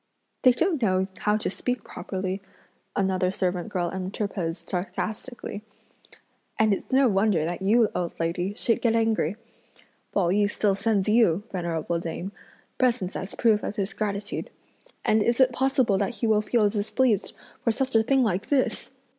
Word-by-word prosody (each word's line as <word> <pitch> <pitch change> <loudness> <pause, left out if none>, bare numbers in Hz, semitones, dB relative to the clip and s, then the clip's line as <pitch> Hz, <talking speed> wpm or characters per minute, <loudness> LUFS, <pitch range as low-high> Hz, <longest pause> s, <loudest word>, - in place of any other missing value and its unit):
"They 255 - +7
don't 325 +3 0
know 190 -3 +2
how 210 0 +2
to 215 - -2
speak 250 +5 -2
properly!" 190 0 -4 0.5
another 190 -2 +1
servant 185 0 -2
girl 175 -4 -1
interposed 185 -3 -3
sarcastically, 210 +4 -4 1.0
"and 220 -1 +4
it's 195 - -5
no 265 0 +5
wonder 195 -6 +2
that 175 +3 -3
you, 220 +4 +4
old 175 -1 -3
lady, 175 +4 -1
should 230 - +1
get 230 -2 +2
angry! 225 -6 +1 0.8
Pao 185 -4 +1
yü 205 +1 +3
still 205 -1 +1
sends 200 0 0
you, 210 -4 +4
venerable 170 -2 -2
dame, 170 +3 -5 0.5
presents 235 -8 +1
as 190 - -5
a - - -12
proof 220 -3 +3
of - - -4
his 200 -2 -2
gratitude, 205 -1 -3 0.6
and 215 0 +4
is 235 +3 +1
it 255 -1 +5
possible 260 -6 +2
that 205 +4 -1
he - - -2
will 215 -1 +3
feel 215 0 +2
displeased 215 +1 0 0.3
for - - +2
such 260 +4 0
a 225 - +7
thing 265 +3 +3
like 195 -4 0
this?" 275 -3 0
205 Hz, 165 wpm, -26 LUFS, 185-230 Hz, 1.0 s, They